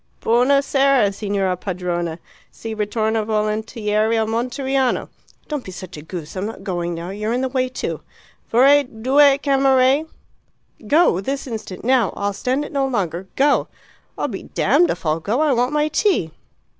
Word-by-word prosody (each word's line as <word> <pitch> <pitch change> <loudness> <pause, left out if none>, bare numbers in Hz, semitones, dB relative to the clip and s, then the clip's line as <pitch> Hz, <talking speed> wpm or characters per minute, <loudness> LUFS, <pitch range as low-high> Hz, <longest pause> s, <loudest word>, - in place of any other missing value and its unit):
"Buona 255 +5 +3
sera, 270 -7 +3
signora 195 -2 -1
padrona. 175 -3 -3 0.3
Si 225 -1 -7
ritorna 220 +1 -1
volontieri 215 0 0
a 220 - +1
Monteriano!" 255 +3 -1 0.4
(Don't 295 -4 -4
be 185 - -8
a 175 -5 -9
goose. 160 0 -8
I'm 190 +2 -2
not 220 -3 -8
going 175 -3 -3
now. 170 +2 -6
You're 210 +3 -3
in 250 - 0
the 260 - -1
way, 255 -1 0
too.) 255 - -4 0.5
"Vorrei 275 +5 +6
due 270 +3 +3
camere 270 +1 +3 0.4
" 220 - -22
"Go. 290 - +3
This 275 +7 -3
instant. 220 -7 -7
Now. 250 -5 +3
I'll 200 0 -1
stand 260 +8 -1
it - - -9
no 275 -2 0
longer. 190 -7 -2
Go!" 285 +1 +3 0.5
"I'm - - -2
damned 350 - +1
if - - -4
I'll 155 +1 +1
go. 210 - -1
I 305 -2 +3
want 245 +1 +1
my 300 0 +1
tea." 310 - +1
225 Hz, 160 wpm, -20 LUFS, 195-270 Hz, 0.5 s, Vorrei